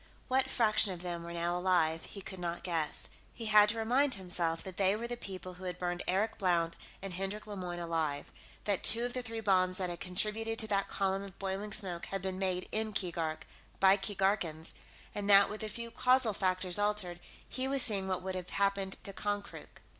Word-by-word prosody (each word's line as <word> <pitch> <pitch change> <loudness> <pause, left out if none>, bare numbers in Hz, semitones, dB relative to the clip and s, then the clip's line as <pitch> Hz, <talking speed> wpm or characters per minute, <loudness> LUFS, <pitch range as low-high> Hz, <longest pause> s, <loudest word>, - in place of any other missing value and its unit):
What 260 +1 +2
fraction 215 -3 +4
of 175 0 -9
them 175 -1 -3
were 170 - -7
now 170 +1 -1
alive, 175 -3 +1
he 200 - -9
could 190 0 -7
not 175 -1 -3
guess. 165 -4 +2 0.3
He 230 - -4
had 210 -1 +6
to 225 - -1
remind 255 +5 +2
himself 175 -3 -2
that 190 -2 -8
they 195 0 +3
were 235 +2 -4
the 240 - -3
people 185 -5 -8
who 185 +1 -10
had 180 -1 -4
burned 175 -1 -2
Eric 200 +5 +1
Blount 170 -3 +1 0.3
and 195 -2 -5
Hendrik 195 +4 -3
Lemoyne 185 -4 -5
alive; 165 -4 -2 0.3
that 200 -3 0
two 235 +2 +6
of 245 - -3
the 255 - -2
three 225 -2 -6
bombs 185 -3 +3
that 185 -2 -2
had 175 - -6
contributed 215 +4 -1
to 220 - +2
that 200 -1 +1
column 195 -1 0
of 195 -2 -10
boiling 195 +2 -3
smoke 185 -5 -3
had 195 -1 -4
been 190 -1 -3
made 185 -1 -1
in 220 0 +1
Keegark, 165 -5 -2 0.4
by 190 0 +7
Keegarkans, 190 -5 -1 0.4
and 205 0 -3
that, 200 0 +8
with 215 - -6
a 215 - -3
few 235 +2 -6
causal 250 -3 +4
factors 185 -1 +2
altered, 205 -4 0 0.3
he 260 0 -2
was 270 -1 +3
seeing 195 -4 +1
what 185 -1 -1
would 190 0 -3
have 180 -1 -5
happened 195 -1 0
to 195 - -6
Konkrook. 205 0 -4
195 Hz, 205 wpm, -32 LUFS, 180-210 Hz, 0.4 s, that